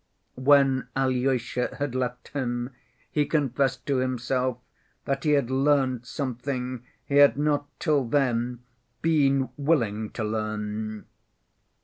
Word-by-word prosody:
When 135 -2 +4
Alyosha 130 -2 0
had 145 -3 -2
left 125 -1 -3
him, 120 -2 -3 0.4
he 150 -1 +1
confessed 135 -4 0
to 140 -2 +1
himself 130 0 0 0.5
that 135 +1 -2
he 150 - +4
had 140 -4 +1
learnt 130 -3 +2
something 130 -2 -3 0.2
he 140 - 0
had 145 -1 +7
not 145 -1 +1
till 150 -5 +2
then 120 -2 0 0.4
been 140 -5 +3
willing 115 -8 +1
to 115 - -3
learn. 110 0 -3
130 Hz, 115 wpm, -26 LUFS, 120-140 Hz, 0.5 s, had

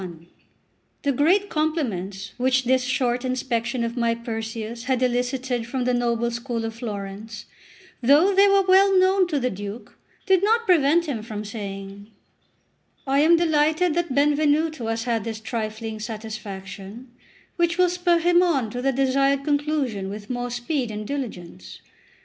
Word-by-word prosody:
XCI 170 -2 -9 0.8
THE 285 - +2
GREAT 345 +10 +2
compliments 210 - -2
which 260 +1 +2
this 255 +1 +2
short 250 -1 0
inspection 250 -1 -1
of 230 +1 -3
my 235 -1 +1
Perseus 230 0 -5
had 255 -1 0
elicited 250 -1 -1
from 255 +1 -2
the 250 0 +1
noble 235 -1 0
school 235 -1 -3
of 225 - -4
Florence, 210 -1 -7 0.6
though 295 +10 +5
they 395 +1 +6
were 395 0 +4
well 385 +1 +5
known 375 0 +4
to 305 -5 -1
the 250 -1 -1
Duke, 205 +4 -8 0.3
did 380 -1 +3
not 455 +3 +2
prevent 335 -2 +4
him 265 -8 -3
from 215 -1 -6
saying: 200 -1 -7 1.0
"I 270 +1 +2
am 330 +3 +5
delighted 315 +1 +2
that 340 -5 -1
Benvenuto 295 -1 +2
has 225 0 -2
had 230 -3 -1
this 220 0 -5
trifling 220 -1 -4
satisfaction, 215 +1 -8 0.5
which 340 -1 +1
will 365 0 +5
spur 355 -1 +2
him 345 +1 +4
on 275 -11 +1
to 245 - -4
the 270 +1 +2
desired 275 +1 +1
conclusion 285 -9 -1
with 205 +3 -7
more 245 0 -3
speed 245 +1 -2
and 210 0 -5
diligence. 180 - -6
250 Hz, 155 wpm, -23 LUFS, 220-305 Hz, 1.0 s, they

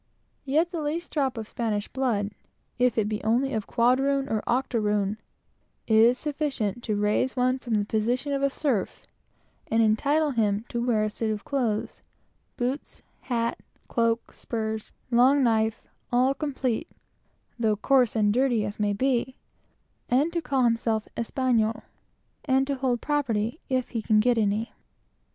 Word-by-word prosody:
Yet 315 +6 +1
the 335 -3 -3
least 315 +4 -3
drop 270 -5 0
of 220 -1 -5
Spanish 215 -3 -2
blood, 225 -6 -1 0.5
if 250 -1 +2
it 215 -2 +2
be 210 -1 -3
only 245 +5 +1
of 220 -2 -2
quadroon 270 +3 +2
or 215 -1 0
octoroon, 215 -5 0 0.7
is 225 +3 +5
sufficient 275 -8 -2
to 215 - 0
raise 210 +5 +1
them 255 +1 +1
from 240 -3 -4
the - - +3
rank - - -22 0.4
of 275 0 +1
slaves, 260 -10 0 0.8
and 225 +1 +3
entitle 285 +8 +2
them 215 -3 0
to 240 +1 -2
a 215 -2 +2
suit 220 +1 -3
of 215 -1 -3
clothes 235 -7 -2 0.6
boots, 255 +4 -3 0.2
hat, 235 -2 -2 0.3
cloak, 230 0 0
spurs, 220 -1 -4 0.2
long 260 +4 +5
knife, 220 -2 +1
and - - -34 0.2
all 255 +2 +3
complete, 275 -1 -2 0.7
though 220 -2 +2
coarse 250 +2 +2
and 205 -2 +3
dirty 245 -4 +2
as 205 +1 -6
may 205 -1 +1
be, 255 +3 0 0.7
and 285 +7 +2
to 340 - 0
call 270 -4 0
themselves 230 -2 +1
Españolos, 230 -2 0 0.6
and 265 -1 +3
to 280 - -1
hold 255 -3 -1
property, 245 -4 -1
if 255 -2 -1
they 230 - -1
can 215 0 +3
get 240 +1 +3
any. 215 +2 0
240 Hz, 150 wpm, -26 LUFS, 220-270 Hz, 0.8 s, is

